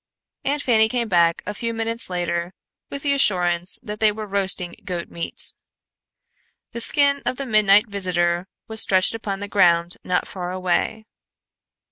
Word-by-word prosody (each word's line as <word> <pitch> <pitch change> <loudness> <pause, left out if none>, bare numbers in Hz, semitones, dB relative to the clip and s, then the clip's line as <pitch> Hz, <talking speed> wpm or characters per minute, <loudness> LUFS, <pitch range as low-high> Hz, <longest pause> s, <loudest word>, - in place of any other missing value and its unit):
Aunt 285 +1 -1
Fanny 220 -3 +3
came 240 -1 -1
back 170 -2 +2
a 205 - -4
few 230 +2 -4
minutes 230 0 -1
later 175 0 -3 0.3
with 280 - -6
the 285 -1 +2
assurance 180 -7 +2
that 210 -2 -7
they 215 -1 +4
were 215 +1 -6
roasting 195 -3 -2
goat 180 -3 -5
meat. 170 - -3 1.2
The 235 - -5
skin 280 +3 +4
of - - -2
the 275 - -4
midnight 210 -2 +4
visitor 180 -3 0 0.2
was 220 0 0
stretched 190 +1 +4
upon 205 -3 -5
the 205 - -4
ground 175 -3 +2
not 180 - -1
far 180 -2 -6
away. 185 +4 -1
200 Hz, 155 wpm, -22 LUFS, 180-225 Hz, 1.2 s, they